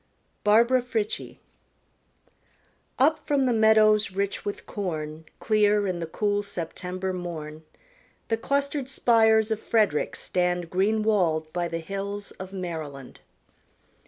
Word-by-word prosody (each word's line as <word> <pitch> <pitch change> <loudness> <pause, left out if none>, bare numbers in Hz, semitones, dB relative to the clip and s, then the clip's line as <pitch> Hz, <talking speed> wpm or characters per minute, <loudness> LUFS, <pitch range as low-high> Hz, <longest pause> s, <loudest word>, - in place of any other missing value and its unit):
_ - - -42 0.4
Barbara 235 +5 +4
Frietchie 225 -4 -3 1.6
Up 310 +4 +3
from 280 -2 +1
the 250 - +2
meadows 215 -1 +5
rich 200 +1 -2
with 205 - -5
corn 160 -5 -5
Clear 210 -1 +3
in 185 -3 -2
the 165 - -4
cool 205 +4 0
September 185 0 -4
morn, 160 -4 -6 0.7
The 225 - 0
clustered 280 +2 -1
spires 220 -3 +3
of 220 - 0
Frederick 215 -10 +1
stand 180 -1 -1
Green 210 +4 +1
walled 165 -7 +1
by 175 -1 -1
the 165 - -3
hills 200 +4 -5
of 190 0 -8
Maryland. 160 -8 -6
200 Hz, 125 wpm, -26 LUFS, 175-220 Hz, 1.6 s, meadows